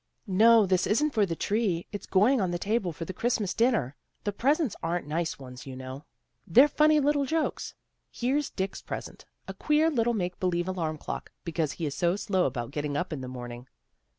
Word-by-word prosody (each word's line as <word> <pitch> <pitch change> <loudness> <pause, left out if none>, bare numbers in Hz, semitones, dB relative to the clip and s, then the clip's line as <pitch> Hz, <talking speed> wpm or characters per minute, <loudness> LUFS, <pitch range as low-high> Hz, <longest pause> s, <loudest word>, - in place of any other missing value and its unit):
"No, 220 +2 +6
this 185 -1 +1
isn't 295 +8 +2
for 210 -3 +3
the 165 - -2
tree. 200 -3 0
It's 205 - -6
going 220 +6 +4
on 185 - +1
the 175 - -1
table 200 -1 0
for 165 +1 -6
the 190 - -6
Christmas 220 -2 0
dinner. 225 - +1 0.3
The 205 - -1
presents 275 - +1
aren't 170 +2 -2
nice 160 +3 -2
ones, 125 -1 -10
you 130 - -7
know. 130 +2 -8 0.4
They're 255 - +7
funny 305 +1 +4
little 290 0 +2
jokes. 320 +1 -2 0.3
Here's 270 +4 -1
Dick's 190 +1 -4
present, - - -7 0.2
a 190 - -5
queer 300 +10 +2
little 235 -3 +1
make 180 -3 -3
believe 175 -1 0
alarm 165 -4 -2
clock, - - -6
because 165 -4 -1
he 165 - -4
is 145 - -2
so 175 +5 +1
slow 195 -3 0
about 120 -2 -4
getting 145 0 -2
up 175 +1 -2
in 140 - -5
the 130 - -6
morning." 120 0 -8
185 Hz, 200 wpm, -28 LUFS, 155-235 Hz, 0.4 s, They're